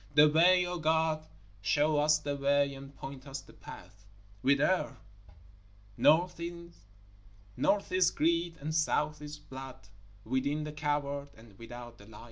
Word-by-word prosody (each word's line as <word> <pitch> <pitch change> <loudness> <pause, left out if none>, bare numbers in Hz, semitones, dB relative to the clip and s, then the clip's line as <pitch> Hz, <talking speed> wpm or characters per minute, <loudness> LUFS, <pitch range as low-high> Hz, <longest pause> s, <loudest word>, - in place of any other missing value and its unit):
The 150 0 +8
way, 180 +4 +5
O 175 0 -4
God, 160 0 +1 0.3
show 145 +9 +2
us 150 +1 +4
the 145 -1 -3
way 140 0 +2
and 135 +1 -11
point 135 0 -9
us 135 0 -5
the - - -17
path. 100 +3 -13 0.4
Whither? 140 +2 +2 1.0
North 175 - +3
is 100 - -2
greed 170 +1 0
and 155 +3 -4
South 150 -1 0
is 150 0 -7
blood; 130 -7 -11 0.4
within, 135 +5 -1
the 150 - -5
coward, 145 -1 -2
and 110 -2 -16
without, 120 0 -10
the 100 - -15
liar. 110 -1 -12
145 Hz, 135 wpm, -31 LUFS, 130-160 Hz, 1.0 s, The